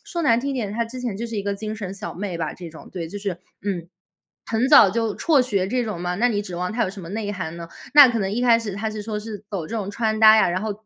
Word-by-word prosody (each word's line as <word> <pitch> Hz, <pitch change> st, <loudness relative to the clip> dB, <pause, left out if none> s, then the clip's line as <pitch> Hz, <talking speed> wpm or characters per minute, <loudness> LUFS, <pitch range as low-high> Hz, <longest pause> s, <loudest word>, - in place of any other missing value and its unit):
说 340 Hz, -2 st, -4 dB
难 235 Hz, -7 st, +4 dB
听 275 Hz, +1 st, -2 dB
点， 215 Hz, -6 st, -3 dB
她 235 Hz, +2 st, -1 dB
之 255 Hz, +2 st, -8 dB
前 240 Hz, -5 st, -3 dB
就 235 Hz, -, -3 dB
是 230 Hz, -2 st, -6 dB
一 200 Hz, -, -2 dB
个 200 Hz, 0 st, -1 dB
精 215 Hz, +2 st, -5 dB
神 195 Hz, -3 st, -5 dB
小 210 Hz, +1 st, -7 dB
妹 185 Hz, -2 st, -4 dB
吧， 160 Hz, -2 st, -2 dB
这 175 Hz, -2 st, -9 dB
种 160 Hz, -, -13 dB
对， 170 Hz, -3 st, -5 dB
就 205 Hz, +5 st, -6 dB
是 200 Hz, -1 st, -2 dB, 0.3 s
嗯， 180 Hz, -4 st, -3 dB, 0.6 s
很 230 Hz, +4 st, 0 dB
早 285 Hz, -10 st, +8 dB
就 225 Hz, 0 st, -1 dB
辍 310 Hz, -5 st, +3 dB
学 200 Hz, -7 st, 0 dB
这 250 Hz, +2 st, 0 dB
种 210 Hz, -6 st, -4 dB
嘛， 180 Hz, 0 st, -2 dB
那 240 Hz, +5 st, +3 dB
你 205 Hz, -3 st, -1 dB
指 185 Hz, -3 st, -8 dB
望 180 Hz, +1 st, -2 dB
她 235 Hz, -, +1 dB
有 185 Hz, -, -3 dB
什 195 Hz, 0 st, -10 dB
么 170 Hz, -, -9 dB
内 205 Hz, 0 st, -3 dB
涵 170 Hz, -4 st, -5 dB
呢？ 170 Hz, -1 st, -8 dB, 0.3 s
那 290 Hz, -3 st, +10 dB
可 235 Hz, -2 st, -1 dB
能 195 Hz, -1 st, -1 dB
一 235 Hz, +4 st, -1 dB
开 235 Hz, -2 st, +5 dB
始 225 Hz, -3 st, -5 dB
她 220 Hz, +2 st, -3 dB
是 215 Hz, 0 st, -6 dB
说 210 Hz, 0 st, -4 dB
是 215 Hz, 0 st, -7 dB
走 185 Hz, -6 st, -4 dB
这 230 Hz, -, -6 dB
种 200 Hz, -2 st, -3 dB
穿 220 Hz, +1 st, -1 dB
搭 220 Hz, 0 st, +9 dB
呀， 215 Hz, -, +4 dB
然 180 Hz, +2 st, -1 dB
后 220 Hz, -, -2 dB
210 Hz, 325 characters per minute, -23 LUFS, 190-230 Hz, 0.6 s, 那